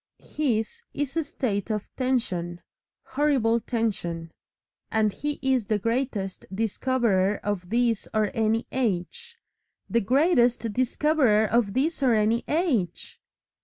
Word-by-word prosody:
His 230 Hz, -8 st, -2 dB
is 285 Hz, 0 st, -2 dB
a 325 Hz, -, +1 dB
state 240 Hz, -, -2 dB
of 210 Hz, -2 st, -4 dB
tension 185 Hz, -10 st, -1 dB, 0.4 s
horrible 260 Hz, -5 st, +2 dB
tension. 205 Hz, -8 st, -2 dB, 0.6 s
And 215 Hz, -2 st, +1 dB
he 295 Hz, 0 st, -3 dB
is 260 Hz, -5 st, +1 dB
the 215 Hz, -, +2 dB
Greatest 225 Hz, -3 st, -2 dB
Discoverer 210 Hz, -1 st, +1 dB
of 190 Hz, -4 st, -3 dB
This 235 Hz, -1 st, +1 dB
or 215 Hz, -2 st, +1 dB
Any 225 Hz, 0 st, +1 dB
Age 260 Hz, -, -2 dB, 0.5 s
the 235 Hz, -, +1 dB
Greatest 245 Hz, -, +2 dB
Discoverer 255 Hz, -2 st, +2 dB
of 220 Hz, -2 st, +1 dB
This 295 Hz, +4 st, 0 dB
or 250 Hz, -4 st, +4 dB
Any 220 Hz, +2 st, +2 dB
Age! 280 Hz, -, -1 dB
230 Hz, 120 wpm, -26 LUFS, 210-265 Hz, 0.6 s, or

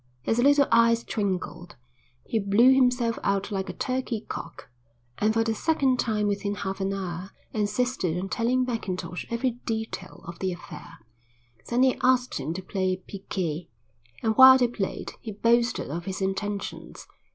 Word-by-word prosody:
His 225 Hz, -, 0 dB
little 285 Hz, +2 st, +5 dB
eyes 230 Hz, 0 st, +4 dB
twinkled. 185 Hz, -4 st, -3 dB, 0.5 s
He 225 Hz, -, 0 dB
blew 215 Hz, +6 st, +5 dB
himself 250 Hz, -3 st, +2 dB
out 200 Hz, 0 st, 0 dB
like 190 Hz, -1 st, -2 dB
a -, -, -4 dB
turkey 255 Hz, -4 st, -2 dB
cock, -, -, -7 dB, 0.5 s
and 215 Hz, +1 st, +3 dB
for 225 Hz, +1 st, +2 dB
the 225 Hz, 0 st, 0 dB
second 270 Hz, 0 st, +1 dB
time 215 Hz, -2 st, 0 dB
within 205 Hz, 0 st, -1 dB
half 195 Hz, -1 st, -4 dB
an 195 Hz, 0 st, 0 dB
hour 185 Hz, -1 st, -4 dB, 0.2 s
insisted 210 Hz, -4 st, 0 dB
on 185 Hz, +2 st, -3 dB
telling 245 Hz, +5 st, +1 dB
Mackintosh 185 Hz, -7 st, -4 dB
every 235 Hz, +2 st, 0 dB, 0.2 s
detail 220 Hz, -4 st, -4 dB
of 170 Hz, 0 st, -8 dB
the 190 Hz, -1 st, -1 dB
affair. 175 Hz, -, -11 dB, 0.7 s
Then 245 Hz, +2 st, +3 dB
he 260 Hz, -1 st, +2 dB
asked 250 Hz, -, +2 dB
him 140 Hz, +3 st, -3 dB
to 190 Hz, -, -5 dB
play 185 Hz, -1 st, -1 dB
piquet, 180 Hz, -4 st, -5 dB, 0.5 s
and 220 Hz, -1 st, +1 dB
while 260 Hz, 0 st, +10 dB
they 250 Hz, -2 st, +3 dB
played 205 Hz, -5 st, -4 dB
he 220 Hz, -, -6 dB
boasted 235 Hz, -, +1 dB
of 170 Hz, +2 st, -4 dB
his 190 Hz, -1 st, -4 dB
intentions. 200 Hz, +1 st, -4 dB
210 Hz, 160 wpm, -26 LUFS, 190-245 Hz, 0.7 s, while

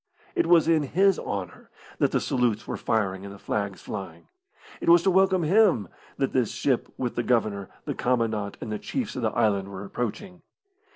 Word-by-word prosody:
It 345 Hz, -, +1 dB
was 165 Hz, -2 st, +5 dB
in 165 Hz, -2 st, +4 dB
his 190 Hz, +7 st, +2 dB
honour 100 Hz, -3 st, -5 dB, 0.3 s
that -, -, +3 dB
the -, -, +2 dB
salutes 120 Hz, -4 st, 0 dB
were -, -, -3 dB
firing 95 Hz, -4 st, -1 dB
and 100 Hz, -, -8 dB
the 100 Hz, -, -10 dB
flags 100 Hz, -2 st, -3 dB
flying. 95 Hz, -5 st, -7 dB, 0.5 s
It -, -, -1 dB
was 170 Hz, 0 st, +7 dB
to 195 Hz, -, +3 dB
welcome 190 Hz, -1 st, +3 dB
him 175 Hz, -, +3 dB, 0.3 s
that 135 Hz, -, -1 dB
this 125 Hz, -4 st, +2 dB
ship 120 Hz, +1 st, 0 dB
with 125 Hz, -2 st, -2 dB
the -, -, -1 dB
Governor, 110 Hz, -5 st, 0 dB, 0.2 s
the -, -, -2 dB
commandant, 110 Hz, -5 st, -1 dB
and 110 Hz, -, -5 dB
the 105 Hz, -, -3 dB
chiefs 250 Hz, -6 st, -4 dB
of 130 Hz, -, -3 dB
the 110 Hz, -, +1 dB
island 100 Hz, -3 st, +1 dB
were 100 Hz, 0 st, -7 dB
approaching. 145 Hz, -, -5 dB
120 Hz, 190 wpm, -26 LUFS, 100-170 Hz, 0.5 s, was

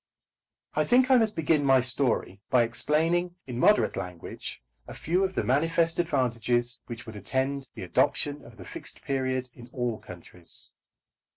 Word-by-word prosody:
I -, -, +3 dB
think 255 Hz, +2 st, +4 dB
I 260 Hz, -, +8 dB
must 220 Hz, -2 st, +1 dB
begin 160 Hz, -2 st, +2 dB
my 135 Hz, -1 st, +5 dB
story 125 Hz, -6 st, +1 dB
by 125 Hz, -2 st, +5 dB
explaining 165 Hz, +9 st, +1 dB
in 125 Hz, -2 st, -5 dB
moderate 210 Hz, +10 st, +4 dB
language 90 Hz, -7 st, -6 dB, 0.2 s
a -, -, -8 dB
few 180 Hz, +4 st, 0 dB
of 190 Hz, -1 st, -1 dB
the -, -, +1 dB
manifest 165 Hz, +5 st, +2 dB
advantages 125 Hz, -5 st, 0 dB
which 120 Hz, -2 st, -7 dB
would 110 Hz, -, -9 dB
attend 130 Hz, +6 st, -2 dB
the -, -, -6 dB
adoption 145 Hz, 0 st, 0 dB
of -, -, -14 dB
the -, -, -10 dB
Fixed -, -, -8 dB
Period 130 Hz, -2 st, -1 dB
in 120 Hz, 0 st, -13 dB
all 120 Hz, -3 st, -2 dB
countries. 90 Hz, 0 st, -8 dB
130 Hz, 160 wpm, -28 LUFS, 120-165 Hz, 0.2 s, I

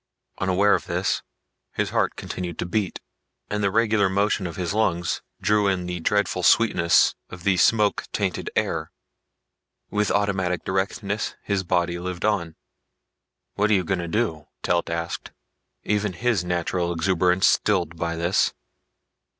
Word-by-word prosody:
Unaware 95 Hz, +2 st, +3 dB
of -, -, -1 dB
this, -, -, 0 dB, 0.5 s
his -, -, -1 dB
heart -, -, +1 dB
continued 90 Hz, -2 st, -5 dB
to -, -, -2 dB
beat 95 Hz, +1 st, -2 dB, 0.5 s
and 105 Hz, 0 st, -1 dB
the 100 Hz, -, +3 dB
regular 110 Hz, -1 st, +2 dB
motion 100 Hz, 0 st, +1 dB
of 85 Hz, -, -7 dB
his 90 Hz, 0 st, -2 dB
lungs 90 Hz, -6 st, 0 dB, 0.2 s
drew 105 Hz, -1 st, +2 dB
in 95 Hz, -2 st, 0 dB
the 90 Hz, 0 st, -4 dB
dreadful 100 Hz, +1 st, 0 dB
sweetness 85 Hz, -5 st, +4 dB, 0.2 s
of 90 Hz, -1 st, -10 dB
the 100 Hz, -1 st, +3 dB
smoke 105 Hz, +2 st, +3 dB
tainted -, -, -2 dB
air. -, -, -1 dB, 1.0 s
With 105 Hz, 0 st, +1 dB
automatic 95 Hz, -3 st, 0 dB
directness 100 Hz, +2 st, -2 dB
his 100 Hz, -2 st, -1 dB
body 85 Hz, -1 st, 0 dB
lived 90 Hz, +1 st, -4 dB
on. 85 Hz, -7 st, 0 dB, 1.0 s
"What 105 Hz, +1 st, +1 dB
you 100 Hz, -4 st, +3 dB
gonna 85 Hz, 0 st, -2 dB
do?" 85 Hz, -6 st, -1 dB, 0.2 s
Telt 85 Hz, -1 st, +1 dB
asked, 85 Hz, 0 st, -4 dB, 0.5 s
even 105 Hz, -2 st, 0 dB
his 115 Hz, 0 st, 0 dB
natural 90 Hz, 0 st, -1 dB
exuberation 90 Hz, +1 st, +1 dB
stilled 90 Hz, -7 st, +2 dB
by 85 Hz, 0 st, -2 dB
this. 85 Hz, +3 st, +1 dB
95 Hz, 140 wpm, -24 LUFS, 85-105 Hz, 1.0 s, sweetness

